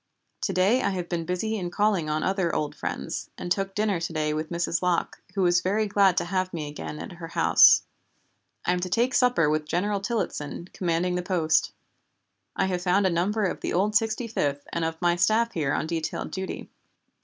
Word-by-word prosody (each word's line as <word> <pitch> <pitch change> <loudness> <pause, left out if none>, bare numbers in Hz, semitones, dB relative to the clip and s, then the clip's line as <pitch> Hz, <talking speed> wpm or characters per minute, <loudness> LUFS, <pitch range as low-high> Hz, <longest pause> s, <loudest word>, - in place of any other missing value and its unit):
To - - 0
day 200 +8 +3
I - - +1
have 180 -3 -3
been 170 -2 -3
busy 220 +5 -2
in 175 -2 -3
calling 195 -4 +1
on 155 +1 0
other 190 -3 0
old 150 -1 -1
friends, - - -4
and 175 - -6
took 195 0 0
dinner 210 -4 +1
to 165 0 -3
day 155 -1 -1
with 155 +1 -3
Mrs. 170 0 -1
Locke, 180 -2 0
who 195 - +1
was 175 0 +4
very 205 +4 +1
glad 195 -3 +3
to - - +1
have 185 +1 -1
me 155 -4 -4
again 150 +1 -7
at - - -7
her 170 -2 -8
house. 165 - +6 0.8
I 180 - +3
am 180 - -1
to 185 +1 -3
take 240 +7 +1
supper 245 - +3
with 155 0 0
General 200 +5 0
Tillottson, 185 -6 -3
commanding 175 0 0
the 180 - -1
post. 175 -4 +1 0.8
I - - +1
have 180 -2 -1
found 185 +2 +2
a 190 - +3
number 200 +6 0
of 190 - -1
the - - -2
old 205 +4 +1
Sixty 225 +1 +1
fifth 145 -10 -2
and 170 - -1
of 160 0 -3
my 175 0 +3
staff 220 +7 +2
here 150 -8 -1
on - - 0
detailed 160 -1 -3
duty. 190 0 -5
180 Hz, 210 wpm, -26 LUFS, 165-200 Hz, 0.8 s, house